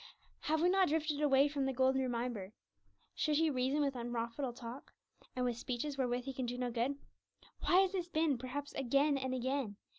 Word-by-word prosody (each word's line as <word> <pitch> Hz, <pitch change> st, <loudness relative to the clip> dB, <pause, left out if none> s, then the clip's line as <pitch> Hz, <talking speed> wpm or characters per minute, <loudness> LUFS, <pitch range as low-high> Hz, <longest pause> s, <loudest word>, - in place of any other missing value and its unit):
Have 315 Hz, +1 st, 0 dB
we 355 Hz, -, +5 dB
not 380 Hz, 0 st, +4 dB
drifted 305 Hz, -1 st, 0 dB
away 275 Hz, -1 st, +5 dB
from 285 Hz, -2 st, -1 dB
the 270 Hz, -, -1 dB
golden 265 Hz, +1 st, +3 dB
reminder, 235 Hz, -5 st, -3 dB, 0.6 s
'Should 305 Hz, -1 st, +1 dB
he 320 Hz, +1 st, +3 dB
reason 265 Hz, +3 st, +1 dB
with 275 Hz, -2 st, 0 dB
unprofitable 240 Hz, +2 st, -3 dB
talk, 240 Hz, +2 st, -9 dB, 0.4 s
and 250 Hz, 0 st, 0 dB
with 240 Hz, -2 st, -1 dB
speeches 260 Hz, +4 st, -3 dB
wherewith 250 Hz, -2 st, 0 dB
he 270 Hz, -, -5 dB
can 255 Hz, -1 st, -3 dB
do 245 Hz, +1 st, -3 dB
no 250 Hz, -1 st, -1 dB
good?' 245 Hz, +4 st, 0 dB, 0.6 s
Why 365 Hz, +2 st, +5 dB
has 380 Hz, -1 st, +2 dB
this 365 Hz, -3 st, -2 dB
been, 315 Hz, -6 st, +1 dB
perhaps 280 Hz, +3 st, -5 dB
again 275 Hz, +3 st, +2 dB
and 260 Hz, -1 st, -1 dB
again? 260 Hz, -4 st, -1 dB
265 Hz, 190 wpm, -35 LUFS, 245-295 Hz, 0.6 s, we